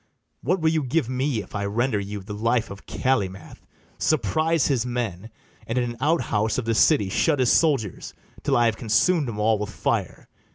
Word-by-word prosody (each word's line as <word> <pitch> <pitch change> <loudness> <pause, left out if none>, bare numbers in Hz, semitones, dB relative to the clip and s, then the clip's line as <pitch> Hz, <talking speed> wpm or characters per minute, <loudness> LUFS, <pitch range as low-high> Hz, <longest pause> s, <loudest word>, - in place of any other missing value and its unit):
What 180 +8 0
will 160 -1 +2
you 160 -1 +1
give 130 -1 -1
me 130 -3 -1
if - - -18
I 100 -1 -2
render 115 +2 0
you 100 0 -5
The 105 +2 -7
life 115 +2 0
of 100 - -11
Calymath, 100 -8 -2 0.3
surprise 160 +1 +1
his 130 -6 +1
men, 115 -5 -4 0.4
And 115 - -2
in 120 -1 0
an 120 - -10
out 160 +4 +2
house 110 +1 0
of 125 - -2
the 115 - +1
city 125 -2 +4
shut 145 - +1
His 130 -3 +3
soldiers, 135 - +1 0.3
till 135 -2 +1
I 120 - +4
have 115 -1 +1
consum'd 130 +7 +2
'em 110 - -6
all 105 0 +2
with 105 0 -3
fire? - - -2
120 Hz, 200 wpm, -24 LUFS, 105-140 Hz, 0.4 s, city